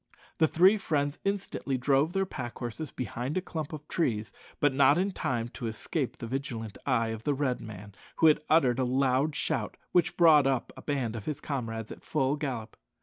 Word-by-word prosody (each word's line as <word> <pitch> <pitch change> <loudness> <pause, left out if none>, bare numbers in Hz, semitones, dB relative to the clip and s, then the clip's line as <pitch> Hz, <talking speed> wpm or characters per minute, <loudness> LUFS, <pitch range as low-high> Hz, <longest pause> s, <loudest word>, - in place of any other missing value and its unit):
The 160 - +5
three 190 +7 +5
friends 145 -5 -1
instantly 195 -9 -2
drove 140 +4 +2
their 195 0 +1
pack 120 -9 -6
horses 125 +5 -5
behind 125 +4 -4
a - - +4
clump 160 -5 -5
of 150 -1 -8
trees; 110 -10 -1 0.3
but 145 -2 +3
not 140 +2 +5
in 190 +3 +1
time 120 -9 -2
to 120 -1 -5
escape 120 +5 -3
the - - -6
vigilant 115 -4 -4
eye 115 -4 +2
of 110 0 -5
the 145 - +1
Red 135 -3 -1
man, 100 -2 -9 0.2
who 160 -2 +6 0.2
uttered 135 -6 +4
a - - +3
loud 135 +3 +2
shout, - - -1
which 175 - +2
brought 155 -5 +7
up 130 -3 -1
a - - -10
band 130 -6 -2
of 110 - -6
his 150 -2 -3
comrades 115 -6 -4
at - - -9
full 135 +2 +1
gallop. 125 -7 -4
135 Hz, 195 wpm, -29 LUFS, 120-155 Hz, 0.3 s, brought